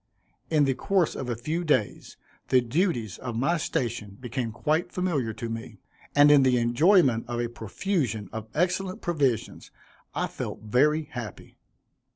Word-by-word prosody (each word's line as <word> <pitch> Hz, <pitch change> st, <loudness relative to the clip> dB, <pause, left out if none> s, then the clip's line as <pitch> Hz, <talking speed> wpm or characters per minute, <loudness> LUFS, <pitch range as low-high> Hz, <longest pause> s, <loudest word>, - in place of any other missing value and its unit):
In 155 Hz, -2 st, +3 dB
the 135 Hz, -, +2 dB
course 185 Hz, +4 st, +1 dB
of 130 Hz, -, -4 dB
a 120 Hz, -, -1 dB
few 155 Hz, +9 st, -3 dB
days 150 Hz, -10 st, -1 dB, 0.3 s
the 130 Hz, -, +5 dB
duties 120 Hz, -, -1 dB
of 120 Hz, -3 st, -5 dB
my 140 Hz, +9 st, +1 dB
station 110 Hz, -9 st, -3 dB
became 125 Hz, -2 st, -3 dB
quite 155 Hz, +9 st, 0 dB
familiar 160 Hz, -11 st, -1 dB
to 115 Hz, +2 st, -5 dB
me; 115 Hz, -1 st, -6 dB, 0.4 s
and 145 Hz, +1 st, +7 dB
in 145 Hz, -2 st, +7 dB
the 130 Hz, -2 st, +4 dB
enjoyment 125 Hz, -, +4 dB
of 120 Hz, 0 st, -3 dB
a 120 Hz, -, 0 dB
profusion 120 Hz, -, -2 dB
of 110 Hz, 0 st, -5 dB
excellent 185 Hz, +3 st, 0 dB
provisions, 140 Hz, -, -1 dB, 0.5 s
I -, -, 0 dB
felt -, -, -6 dB
very 150 Hz, +8 st, +3 dB
happy. 120 Hz, -, -9 dB
130 Hz, 155 wpm, -27 LUFS, 115-160 Hz, 0.5 s, and